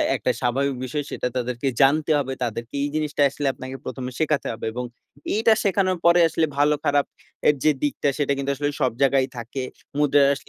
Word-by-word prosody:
একটা -, -, 0 dB
স্বাভাবিক 135 Hz, +2 st, 0 dB
বিষয়, 145 Hz, +4 st, -3 dB
সেটা -, -, -2 dB
তাদেরকে 125 Hz, +2 st, -2 dB
জানতে 155 Hz, +3 st, +4 dB
হবে, 135 Hz, -1 st, -2 dB
তাদেরকে 115 Hz, +2 st, -4 dB
এই 145 Hz, -, -1 dB
জিনিসটা 150 Hz, -1 st, -1 dB
আসলে 140 Hz, +1 st, -3 dB
আপনাকে 130 Hz, +1 st, -8 dB
১ম 130 Hz, 0 st, -5 dB
এ -, -, -11 dB
শেখাতে 155 Hz, -2 st, +1 dB
হবে, 110 Hz, -, -7 dB
এবং 125 Hz, -, -3 dB, 0.5 s
এইটা 220 Hz, +1 st, +4 dB
শেখানোর 190 Hz, -2 st, +1 dB
পরে 170 Hz, +1 st, +6 dB
আসলে 160 Hz, 0 st, +1 dB
ভালো 150 Hz, +1 st, +4 dB
খারাপ 145 Hz, 0 st, +3 dB, 0.4 s
এর 150 Hz, -, +5 dB
যে 155 Hz, -, +5 dB
দিকটা, 145 Hz, 0 st, 0 dB
সেটা 140 Hz, -1 st, 0 dB
কিন্তু 140 Hz, 0 st, -1 dB
আসলে 145 Hz, +1 st, -1 dB
সব 130 Hz, -, +3 dB
জায়গায় 135 Hz, -1 st, +3 dB
থাকে। 120 Hz, +3 st, -5 dB, 0.4 s
মুদ্রায় 140 Hz, -1 st, +4 dB
140 Hz, 190 wpm, -23 LUFS, 130-150 Hz, 0.5 s, পরে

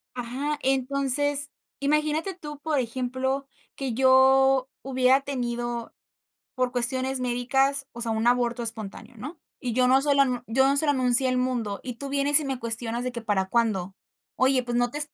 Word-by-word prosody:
Ajá, 265 Hz, +5 st, -3 dB
entonces 275 Hz, +2 st, +1 dB, 0.3 s
imagínate 300 Hz, +5 st, 0 dB
tú, 295 Hz, -4 st, -9 dB
por 305 Hz, -2 st, -1 dB
ejemplo, 260 Hz, +3 st, -3 dB, 0.3 s
que 270 Hz, -3 st, -4 dB
yo 265 Hz, +1 st, +4 dB
hubiera 260 Hz, 0 st, +2 dB
tenido 240 Hz, -3 st, -4 dB, 0.6 s
por 255 Hz, -1 st, -1 dB
cuestiones 260 Hz, +1 st, 0 dB
médicas, 270 Hz, +3 st, 0 dB
o 235 Hz, -, -9 dB
sea, 230 Hz, -1 st, +1 dB
un 220 Hz, +1 st, -1 dB
aborto 240 Hz, 0 st, +1 dB
espontáneo, 225 Hz, +1 st, -5 dB
¿no? 295 Hz, +9 st, -8 dB, 0.2 s
Y 245 Hz, -5 st, -3 dB
yo 250 Hz, 0 st, +3 dB
no 265 Hz, +1 st, +5 dB
se 285 Hz, 0 st, +1 dB
lo 255 Hz, -3 st, +2 dB
yo 265 Hz, +4 st, +2 dB
no 275 Hz, -, +2 dB
se 310 Hz, -, +2 dB
lo 290 Hz, -, +3 dB
anuncié 255 Hz, 0 st, +2 dB
al 255 Hz, -, 0 dB
mundo, 245 Hz, -5 st, -2 dB
y 250 Hz, -2 st, -6 dB
tú 280 Hz, +3 st, -7 dB
vienes 280 Hz, +2 st, +4 dB
y 300 Hz, -, -5 dB
me 270 Hz, -2 st, -3 dB
cuestionas 230 Hz, +1 st, -2 dB
de 255 Hz, -, -3 dB
que 235 Hz, -, -5 dB
para 195 Hz, -4 st, -1 dB
cuándo. 200 Hz, -5 st, 0 dB, 0.4 s
Oye, 260 Hz, 0 st, +2 dB
pues 240 Hz, 0 st, -3 dB
no 245 Hz, 0 st, +1 dB
te 295 Hz, -, -4 dB
255 Hz, 180 wpm, -25 LUFS, 240-275 Hz, 0.6 s, no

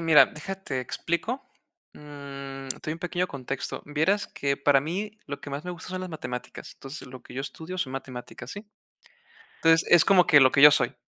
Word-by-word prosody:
mira, 165 Hz, -2 st, +7 dB
deja 195 Hz, +6 st, -6 dB
te 165 Hz, -9 st, -5 dB
explico. 170 Hz, -, -3 dB, 0.5 s
Mm, 140 Hz, -2 st, -9 dB
te 130 Hz, -, +2 dB
doy -, -, 0 dB
un 165 Hz, -, -7 dB
pequeño 175 Hz, 0 st, -1 dB
contexto. 135 Hz, -3 st, -5 dB
Vieras 160 Hz, +8 st, +1 dB
que, 140 Hz, 0 st, -1 dB
para 140 Hz, -1 st, +4 dB
mí, 205 Hz, +8 st, -4 dB
lo 145 Hz, -, -6 dB
que 145 Hz, -, -8 dB
más 145 Hz, +4 st, -5 dB
me 180 Hz, -, -4 dB
gusta 170 Hz, 0 st, -9 dB
son 185 Hz, 0 st, -4 dB
las 185 Hz, -, -5 dB
matemáticas, 125 Hz, -6 st, -7 dB
entonces 135 Hz, 0 st, -9 dB
lo 125 Hz, -1 st, -10 dB
que -, -, -14 dB
yo 130 Hz, -, -3 dB
estudio 160 Hz, +6 st, -6 dB
son 150 Hz, -8 st, -2 dB
matemáticas, 130 Hz, -2 st, -7 dB
¿sí? 205 Hz, +1 st, -8 dB, 1.0 s
Entonces, 165 Hz, 0 st, +5 dB
es 175 Hz, -2 st, +8 dB
como 185 Hz, -2 st, +5 dB
que 150 Hz, -, +7 dB
lo 130 Hz, -1 st, +7 dB
que 140 Hz, -, +3 dB
yo 150 Hz, +1 st, +11 dB
soy. 130 Hz, -2 st, +2 dB
150 Hz, 205 wpm, -26 LUFS, 135-175 Hz, 1.0 s, yo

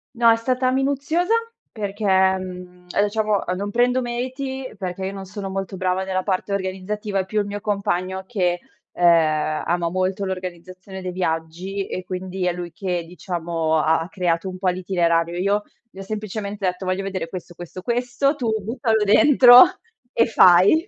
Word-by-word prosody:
No, 230 Hz, -1 st, +5 dB
è -, -, +5 dB
stata 255 Hz, +2 st, 0 dB
minuziosa 285 Hz, -, 0 dB, 0.4 s
perché 205 Hz, 0 st, -5 dB
mhmm, 185 Hz, -2 st, 0 dB, 0.2 s
diciamo 210 Hz, 0 st, +1 dB
a 180 Hz, -, -1 dB
non 200 Hz, +2 st, -3 dB
prendo 245 Hz, +3 st, +2 dB
meriti, 260 Hz, +2 st, -4 dB
perché 190 Hz, 0 st, -4 dB
io 195 Hz, -, -4 dB
non 195 Hz, -1 st, -7 dB
sono 195 Hz, 0 st, -6 dB
molto 195 Hz, 0 st, -4 dB
brava 185 Hz, +1 st, 0 dB
nella 185 Hz, -1 st, -2 dB
parte 195 Hz, 0 st, -2 dB
organizzativa, 195 Hz, +1 st, -2 dB
è 185 Hz, -, -1 dB
più 215 Hz, +2 st, -1 dB
il -, -, -3 dB
mio 205 Hz, 0 st, -5 dB
compagno 190 Hz, -2 st, -2 dB
che, 180 Hz, -5 st, 0 dB, 0.3 s
uhm, 175 Hz, -, -4 dB
ama 165 Hz, +1 st, +2 dB
molto 185 Hz, +2 st, -1 dB
l'organizzazione 185 Hz, +1 st, -7 dB
dei 180 Hz, -, -3 dB
viaggi 180 Hz, +3 st, -3 dB
e 185 Hz, -, -5 dB
quindi 185 Hz, 0 st, -4 dB
è 175 Hz, -, +1 dB
lui 175 Hz, -1 st, -6 dB
che, 180 Hz, -5 st, -2 dB
diciamo, 165 Hz, -2 st, -2 dB
ha 160 Hz, +1 st, +3 dB
ha 170 Hz, -, -6 dB
creato 180 Hz, 0 st, -1 dB
un 185 Hz, -, -7 dB
po' 185 Hz, -1 st, +1 dB
l'itinerario. 175 Hz, -2 st, 0 dB
Io 200 Hz, +3 st, +1 dB, 0.3 s
gli 190 Hz, -, -13 dB
ho -, -, -5 dB
semplicemen 210 Hz, 0 st, -5 dB
detto: 185 Hz, -1 st, -2 dB
"Voglio 185 Hz, +1 st, -1 dB
vedere 185 Hz, -4 st, -4 dB
questo, 180 Hz, -1 st, -8 dB
questo, 175 Hz, +1 st, -9 dB
questo, 245 Hz, +4 st, 0 dB
tu 245 Hz, -5 st, -2 dB
buttalo 225 Hz, -1 st, 0 dB
dentro 250 Hz, +2 st, +8 dB, 0.5 s
e 230 Hz, -, +3 dB
fai". 200 Hz, -, +5 dB
190 Hz, 170 wpm, -22 LUFS, 180-215 Hz, 0.5 s, dentro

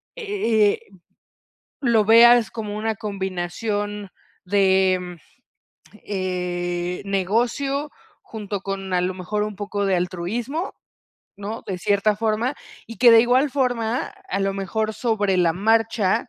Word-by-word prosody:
e 310 Hz, -, +1 dB
eh, -, -, -6 dB, 1.0 s
lo 235 Hz, -5 st, +3 dB
veas 235 Hz, +2 st, +6 dB
como 210 Hz, -2 st, -5 dB
una 220 Hz, +1 st, -1 dB
combinación 205 Hz, +1 st, -4 dB, 0.3 s
de, 190 Hz, -1 st, +3 dB
mm, 180 Hz, -1 st, -8 dB, 0.9 s
eh, 180 Hz, -2 st, -3 dB
negocio, 235 Hz, +9 st, -1 dB, 0.3 s
junto 205 Hz, -3 st, -6 dB
con, 195 Hz, -1 st, -5 dB
a 180 Hz, -, +3 dB
lo 180 Hz, +1 st, -1 dB
mejor, 190 Hz, +3 st, -3 dB
un 210 Hz, -1 st, -4 dB
poco 205 Hz, 0 st, -3 dB
de 195 Hz, -2 st, +2 dB
altruismo, 210 Hz, -, -3 dB, 0.6 s
¿no?, 205 Hz, +3 st, -6 dB
de 190 Hz, -, -3 dB
cierta 205 Hz, +3 st, +1 dB
forma. 225 Hz, +4 st, 0 dB, 0.3 s
Y 230 Hz, -, -9 dB
que 245 Hz, -1 st, +7 dB
de 230 Hz, -1 st, +8 dB
igual 255 Hz, +4 st, +3 dB
forma, 245 Hz, -3 st, 0 dB, 0.2 s
a 200 Hz, -, -1 dB
lo 195 Hz, 0 st, 0 dB
mejor, 215 Hz, +3 st, -2 dB
sobre 210 Hz, -4 st, 0 dB
la 175 Hz, -2 st, +3 dB
marcha, 225 Hz, +2 st, +1 dB
205 Hz, 130 wpm, -22 LUFS, 190-230 Hz, 1.0 s, de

